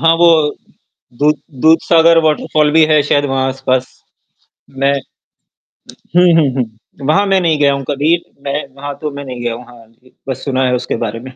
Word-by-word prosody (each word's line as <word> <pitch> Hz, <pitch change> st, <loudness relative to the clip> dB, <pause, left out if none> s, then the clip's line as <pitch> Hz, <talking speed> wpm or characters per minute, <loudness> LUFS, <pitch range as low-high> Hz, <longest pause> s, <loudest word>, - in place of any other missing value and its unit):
हाँ, 165 Hz, +2 st, +4 dB
वो 170 Hz, +1 st, +4 dB, 0.9 s
दूध 150 Hz, +1 st, +3 dB, 0.3 s
दूधसागर 165 Hz, +1 st, +4 dB
वाटरफॉल 155 Hz, -1 st, +1 dB
भी 160 Hz, 0 st, +5 dB
है 155 Hz, -2 st, +3 dB
शायद 145 Hz, 0 st, +1 dB
वहाँ 135 Hz, -1 st, -1 dB
आस-पास। 130 Hz, -1 st, -1 dB, 0.9 s
मैं 140 Hz, +1 st, +2 dB, 1.2 s
हुँ, 180 Hz, -, +6 dB, 0.2 s
हुँ, 145 Hz, -4 st, +2 dB
हुँ, 115 Hz, +2 st, -7 dB
वहाँ 195 Hz, +7 st, +3 dB
मैं 195 Hz, -1 st, +3 dB
नहीं 160 Hz, -4 st, +1 dB
गया 140 Hz, -1 st, +3 dB
हूँ 140 Hz, 0 st, -4 dB
कभी, 150 Hz, +4 st, +2 dB, 0.3 s
मैं 140 Hz, +1 st, -3 dB
वहाँ 140 Hz, +1 st, -7 dB
तो 150 Hz, -1 st, -3 dB
मैं 140 Hz, 0 st, -8 dB
नहीं 125 Hz, -2 st, -7 dB
गया 120 Hz, -1 st, -2 dB
हूँ, 120 Hz, +1 st, -9 dB
हाँ 120 Hz, -2 st, -16 dB
जी, 125 Hz, +3 st, -27 dB
बस 130 Hz, -, -5 dB
सुना 130 Hz, -2 st, 0 dB
है 125 Hz, -, +1 dB
उसके 125 Hz, -, -3 dB
बारे 115 Hz, +1 st, -5 dB
में। 130 Hz, +2 st, -10 dB
140 Hz, 185 wpm, -15 LUFS, 130-155 Hz, 1.2 s, हुँ